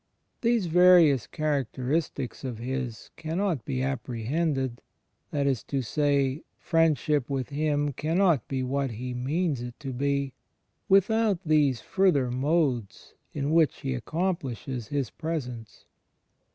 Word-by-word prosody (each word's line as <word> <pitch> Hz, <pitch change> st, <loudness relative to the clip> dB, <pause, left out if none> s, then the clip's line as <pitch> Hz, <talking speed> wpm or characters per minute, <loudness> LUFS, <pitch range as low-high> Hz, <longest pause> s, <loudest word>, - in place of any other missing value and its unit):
These 235 Hz, -4 st, +2 dB
various 170 Hz, -6 st, +6 dB
characteristics 140 Hz, -1 st, -2 dB
of 125 Hz, -4 st, -4 dB
His 125 Hz, -1 st, -5 dB
cannot 165 Hz, -, -2 dB
be 130 Hz, -2 st, -2 dB
apprehended 130 Hz, +1 st, -2 dB, 0.2 s
— -, -, -48 dB
that 145 Hz, -2 st, -1 dB
is 135 Hz, -6 st, +1 dB
to 135 Hz, -2 st, -2 dB
say, 140 Hz, +2 st, +1 dB, 0.2 s
Friendship 150 Hz, -5 st, +1 dB
with 135 Hz, -3 st, -2 dB
Him 145 Hz, 0 st, 0 dB
cannot 165 Hz, -, +2 dB
be 130 Hz, -1 st, -2 dB
what 135 Hz, +1 st, -1 dB
He 125 Hz, +2 st, -5 dB
means 140 Hz, +3 st, -1 dB
it 120 Hz, 0 st, -8 dB
to 135 Hz, -3 st, -5 dB
be 140 Hz, +1 st, -1 dB, 0.3 s
— -, -, -48 dB
without 200 Hz, 0 st, +3 dB
these 145 Hz, -6 st, +3 dB
further 160 Hz, -10 st, +2 dB
modes 130 Hz, -, -1 dB, 0.2 s
in 145 Hz, 0 st, -2 dB
which 160 Hz, -2 st, +3 dB
He 135 Hz, -1 st, -2 dB
accomplishes 135 Hz, -, -3 dB
His 140 Hz, -5 st, -2 dB
Presence. 125 Hz, -9 st, -5 dB
140 Hz, 125 wpm, -27 LUFS, 125-160 Hz, 0.3 s, various